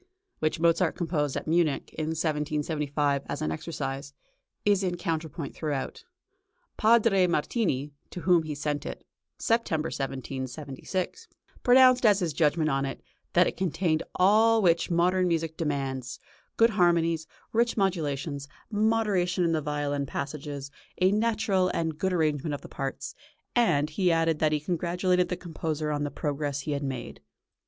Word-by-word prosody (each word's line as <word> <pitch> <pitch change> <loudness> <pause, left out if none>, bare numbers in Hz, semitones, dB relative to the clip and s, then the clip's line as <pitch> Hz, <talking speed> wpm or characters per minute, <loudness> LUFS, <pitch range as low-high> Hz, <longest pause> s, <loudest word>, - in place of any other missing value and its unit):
which 155 0 0
Mozart 170 +1 +3
composed 155 -5 -1
at - - -4
Munich 160 -3 +1
in 155 -1 -3
1775 150 -2 -1
as - - -3
an 75 - -1
exercise, 140 - -5 0.5
is 205 -2 +4
in 180 -2 -1
counterpoint 160 -3 -3
throughout. 145 -4 -4 0.7
Padre 215 -4 +4
Martini, 150 - 0 0.2
to 180 - -7
whom 180 -2 +4
he 155 -2 -5
sent 145 0 -2
it - - -7 0.3
(September, 165 -9 0
1776), 135 - -4 0.3
pronounced, 255 0 +6
as 210 -4 +6
his 175 -6 -1
judgment 155 +1 +2
on 135 -2 +1
it, 135 -1 -5 0.3
that - - +6
it - - -2
contained 170 -3 0
all 220 +4 +5
which 170 -2 +3
modern 180 +2 +2
music 165 -2 -1
demands 135 -5 -3 0.4
good 230 0 +5
harmonies, 170 -4 +2 0.3
rich 235 +1 +2
modulations, 150 -7 -1 0.2
moderation 205 -5 +1
in 170 - +2
the 160 -1 +1
violin 145 -1 -2
passages, 140 0 -5 0.3
a 185 +1 +4
natural 210 -3 +2
and 160 -2 -2
good 190 - +1
arrangement 155 -3 0
of - - -9
the - - -10
parts 135 -1 -5 0.4
and 155 -11 +3
he 180 +2 +2
added 165 -1 +2
that 155 -1 +2
he 150 - +1
congratulated 180 +2 0
the 180 - -2
composer 155 -2 -3
on 145 0 -1
the 145 - -1
progress 145 -1 -2
he 150 - -4
had 140 -1 -1
made. 130 - -5
160 Hz, 145 wpm, -27 LUFS, 145-185 Hz, 0.7 s, pronounced